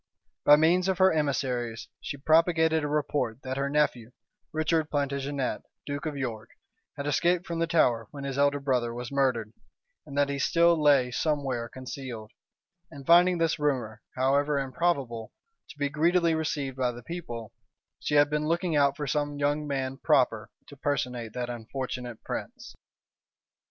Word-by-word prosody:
By 145 - +9
means 170 +4 +3
of 190 -2 +1
her 190 -1 +5
emissaries, 125 -6 -1
she 145 - -6
propagated 160 +1 +3
a - - 0
report 145 -5 -1
that 130 0 -4
her 140 0 0
nephew, 140 -6 +1 0.4
Richard 155 0 0
Plantagenet, 140 -1 -2 0.2
duke 145 +2 -4
of 150 -2 -4
York, 115 -5 -4 0.5
had 140 - -4
escaped 170 +5 +1
from 170 -2 -4
the 165 - +1
Tower 120 -9 +2
when 140 -1 -8
his 135 -1 -3
elder 145 0 +2
brother 125 -4 0
was 120 +2 -6
murdered, 125 -6 0 0.5
and 140 -1 -7
that 145 0 +4
he 140 0 -2
still 170 +3 +4
lay 145 -5 +4
somewhere 135 -4 -1
concealed: 130 -4 -7 0.6
and 140 -4 -11
finding 175 +2 +6
this 165 -1 +1
rumor, 125 -7 -1
however 140 +3 +2
improbable, 135 -5 -1 0.4
to - - -12
be 145 -1 0
greedily 165 +3 +2
received 145 -4 -2
by 125 -2 +1
the 120 0 -11
people, 120 -9 -6 0.5
she 150 - -1
had 145 0 +6
been 150 +1 -1
looking 170 0 0
out 140 -1 +3
for 150 - -3
some 145 +1 -1
young 145 +1 0
man 135 -1 -2
proper 120 -8 +2 0.2
to 145 - -13
personate 125 -5 -2
that 125 -1 -3
unfortunate 120 0 -6
prince. - - -6
140 Hz, 160 wpm, -28 LUFS, 125-155 Hz, 0.6 s, By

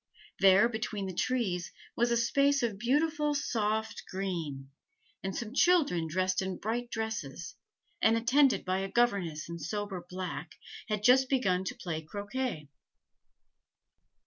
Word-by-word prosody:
There, 195 +3 +6
between 220 -3 -3
the 190 - -4
trees, 190 -5 -1 0.2
was 240 +1 +2
a 235 - +2
space 275 +3 +2
of 215 -4 -1
beautiful 295 +4 +1
soft 220 -5 -1
green; 165 -8 -4 0.5
and 195 -1 -4
some 230 -1 -5
children 285 - +3
dressed 185 +4 0
in 190 -1 -3
bright 235 +3 -3
dresses, 210 - -4 0.5
and 225 +1 +4
attended 260 +4 +3
by 185 0 0
a 195 - -2
governess 195 -10 +1
in 170 0 -6
sober 195 +3 -4
black, 180 -2 -5 0.3
had 210 -1 -1
just 260 +3 +5
begun 190 -9 +1
to - - -4
play 160 -3 -4
croquet. 205 - -4
210 Hz, 135 wpm, -30 LUFS, 185-240 Hz, 0.5 s, There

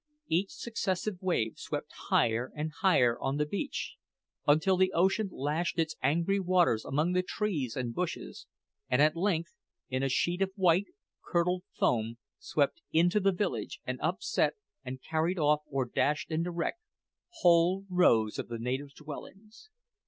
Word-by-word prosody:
Each 185 +4 0
successive 200 -4 -3
wave 170 - 0
swept - - -5 0.2
higher 115 +2 +2
and 155 +1 -3
higher 130 -11 +4
on 135 +2 -1
the 150 - +1
beach 200 - -4 0.5
until 160 +6 +4
the 185 0 +3
ocean 190 +4 +2
lashed 155 +6 -2
its 160 -1 0
angry 170 +8 +2
waters 180 - +3
among 155 +6 0
the 180 0 +2
trees 180 - -2
and 125 -3 -3
bushes, 180 +3 -4 0.4
and 125 - +2
at 150 +2 +5
length, 170 -2 0 0.4
in 130 0 -1
a 135 - +1
sheet 175 +9 0
of 195 - +2
white, 185 0 +3 0.4
curdled 180 +1 0
foam, 115 -1 +1 0.2
swept 145 +3 0
into 175 +5 +4
the 195 0 +3
village 195 +3 -2
and - - -3
upset - - 0 0.3
and 130 0 -7
carried 165 +3 0
off, 150 -1 +3
or 135 -3 -1
dashed 150 +6 0
into 165 +2 0
wreck, 170 - -2 0.6
whole 175 +2 +4
rows 115 - +3
of - - -4
the 120 - -5
native 130 +4 -3
dwellings! 200 - -11
165 Hz, 150 wpm, -30 LUFS, 140-185 Hz, 0.6 s, at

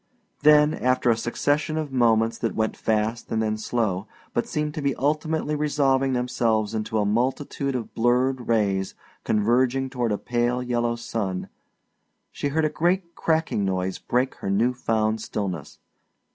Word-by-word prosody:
Then 150 0 +6
after 130 -3 +2
a - - +3
succession 145 +7 0
of 155 -3 -3
moments 115 -3 +2
that 115 - -2
went 110 0 0
fast 110 +2 -1
and 110 - +1
then 110 -1 0
slow, 110 -3 -1 0.3
but 120 - 0
seemed 150 0 -2
to 155 - -4
be 140 -1 0
ultimately 155 +2 0
resolving 135 -3 +2
themselves 115 -4 0
into 110 0 -2
a 105 - +2
multitude 130 +5 -1
of 120 -3 -4
blurred 125 +2 +1
rays 100 -4 +1 0.3
converging 125 +5 +1
toward 120 -4 -1
a 105 - +1
pale 120 +2 0
yellow 120 -1 0
sun, 105 -5 -3 0.8
she - - -3
heard 155 +2 +1
a - - +2
great 175 +2 0
cracking 160 -10 0
noise 95 -1 -1
break 125 +2 0
her 100 - -2
new 115 +6 +2
found 110 -3 0
stillness. 95 -9 -4
120 Hz, 155 wpm, -24 LUFS, 110-140 Hz, 0.8 s, Then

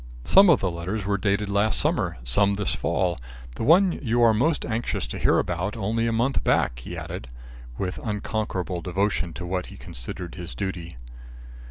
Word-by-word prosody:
"Some 195 0 +7
of 160 - +5
the 95 - 0
letters 90 +5 -4
were 100 0 0
dated 105 0 +1
last 100 +2 +2
summer, - - +1
some 100 +12 +3
this 100 -1 -1
fall. 90 -5 0 0.3
The - - -8
one 180 - +6
you 120 -2 +2
are 115 -1 +6
most 145 +9 +1
anxious 115 +1 -2
to - - -6
hear - - +3
about 90 +6 -1
only 115 +2 0
a - - +1
month 120 +4 +1
back," - - +1
he 65 - -7
added, 65 - -6 0.5
with 95 -1 -3
unconquerable 105 -4 -2
devotion 95 0 0
to 90 - -6
what 90 +1 -2
he - - -11
considered 85 +8 -7
his 90 -1 -7
duty. 85 -6 -5
100 Hz, 180 wpm, -25 LUFS, 90-115 Hz, 0.5 s, Some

